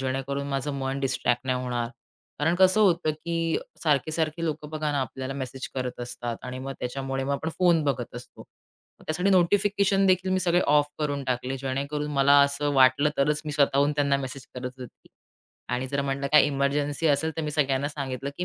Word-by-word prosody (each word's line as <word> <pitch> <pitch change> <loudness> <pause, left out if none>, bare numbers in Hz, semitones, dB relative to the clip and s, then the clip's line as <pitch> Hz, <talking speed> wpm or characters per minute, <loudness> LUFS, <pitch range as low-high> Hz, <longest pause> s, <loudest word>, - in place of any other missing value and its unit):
जेणेकरून 135 +1 -2
माझं 140 +1 -2
मन 135 +1 -2
डिस्ट्रॅक्ट 130 -1 0
नाही 125 0 0
होणार. 120 -2 -2 0.5
कारण 160 +3 +2
कसं 190 +3 +4
होतं, 175 -5 +3
की 165 +1 -2
अ, - - -4 0.2
सारखे-सारखे 155 +2 0
लोकं 150 -2 -3
बघा 155 -1 -2
ना 140 - 0
आपल्याला 130 0 -4
मेसेज 130 -1 -5
करत 125 -1 -4
असतात 120 -1 -4
आणि 130 0 -5
मग 135 +1 -5
त्याच्यामुळे 135 +1 -3
मग 140 - -1
आपण 150 +3 -2
फोन 175 -3 +4
बघत 130 -5 -2
असतो. 120 - -11
मग - - -21
त्यासाठी 180 +5 +1
नोटिफिकेशन 195 +2 +3
देखील 185 0 +2
मी 185 - +1
सगळे 175 0 +2
ऑफ 145 -1 +4
करून 145 -2 -1
टाकले 125 +1 -2
जेणेकरून 140 +3 -3
मला 140 +1 +5
असं 140 +1 0
वाटलं 135 +3 +5
तरच 150 +2 +2
मी 150 - -4
स्वतःहून 140 0 +3
त्यांना 140 -1 +2
मेसेज 135 -1 -6
करत 125 0 -5
होती 125 -2 -12 0.6
आणि 125 +1 -1
जर 140 +1 -1
म्हटलं 140 0 -2
काही 150 - +7
एमर्जन्सी 145 +2 0
असेल 150 +2 +2
तर 160 - -2
मी 150 - -2
सगळ्यांना 140 -2 +1
सांगितलं, 140 -2 -4
की 180 - -1
140 Hz, 190 wpm, -26 LUFS, 135-155 Hz, 0.6 s, काही